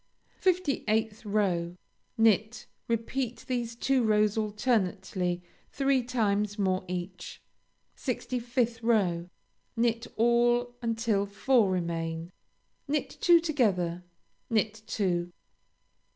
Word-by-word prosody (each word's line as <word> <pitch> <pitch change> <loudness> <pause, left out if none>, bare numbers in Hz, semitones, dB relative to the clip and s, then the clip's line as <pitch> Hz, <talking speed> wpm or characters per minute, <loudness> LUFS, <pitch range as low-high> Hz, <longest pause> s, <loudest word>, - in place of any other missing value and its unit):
58th 225 - +1
row 180 -5 0 0.4
Knit. 220 +1 +2 0.2
Repeat 235 +2 -2
these 240 -2 -2
two 265 +2 +2
rows 215 -1 +3
alternately 195 -5 0 0.3
three 275 -2 +2
times 210 -4 0
more 190 -2 +1
each. 180 0 -6 0.6
65th 240 -1 -2
row 185 -7 +1 0.5
Knit 230 0 +1
all 240 +1 +3
until 225 -3 0
four 210 +2 +3
remain; 165 -2 -2 0.6
knit 295 +1 -1
two 345 -1 +7
together; 195 - 0 0.5
knit 220 -1 0
two. 175 -5 -1
220 Hz, 90 wpm, -29 LUFS, 185-240 Hz, 0.6 s, two